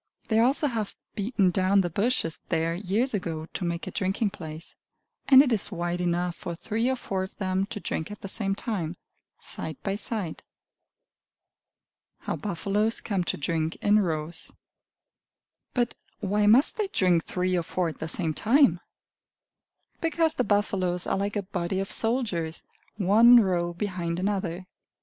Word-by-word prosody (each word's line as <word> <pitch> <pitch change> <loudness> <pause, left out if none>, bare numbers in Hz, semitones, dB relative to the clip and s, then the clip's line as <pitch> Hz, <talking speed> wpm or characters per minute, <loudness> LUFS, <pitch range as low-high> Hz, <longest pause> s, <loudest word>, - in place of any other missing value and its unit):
They 220 -1 +3
also 265 +6 +3
have 225 -7 -2 0.2
beaten 200 -3 +1
down 190 +2 +3
the 175 - -1
bushes 200 -4 0
there 165 +1 +1
years 205 +8 0
ago, 165 -6 -3
to - - -4
make 170 0 -2
a - - -5
drinking 195 +2 0
place; 160 -2 -8 0.5
and 270 0 +9
it 265 - -1
is 215 -2 +1
wide 175 -1 -2
enough 175 0 0
for 170 - -6
three 225 +7 -1
or 260 - +1
four 195 -6 -3
of 190 - -6
them 190 0 0
to 210 - -6
drink 160 -5 -3
at 210 - -9
the - - -5
same 195 0 -1
time, 180 -7 -3 0.4
side 155 -2 -5
by 195 -1 -1
side. 205 -7 -4 1.8
How - - -3
Buffaloes 205 +3 -1
Come 195 -5 -1
to - - -2
Drink 160 +1 -1
in 210 +1 +3
Rows 165 -3 -2 1.2
But 240 -2 +1 0.3
why 205 +1 +1
must 245 +8 +5
they 425 -2 0
drink 180 - +2
three 185 0 0
or 175 - +2
four 175 +2 -1
at 155 - -10
the 160 - -3
same 160 -1 0
time? 265 - +4 1.2
Because 325 -1 +2
the 255 - 0
buffaloes 190 -4 +1
are - - 0
like 200 +2 -2
a 205 - -1
body 185 -1 -2
of 195 - -3
soldiers, 210 -9 -1 0.3
one 220 +5 +7
row 175 -4 +1
behind 175 -2 -3
another. 190 -2 -2
195 Hz, 160 wpm, -27 LUFS, 175-215 Hz, 1.8 s, and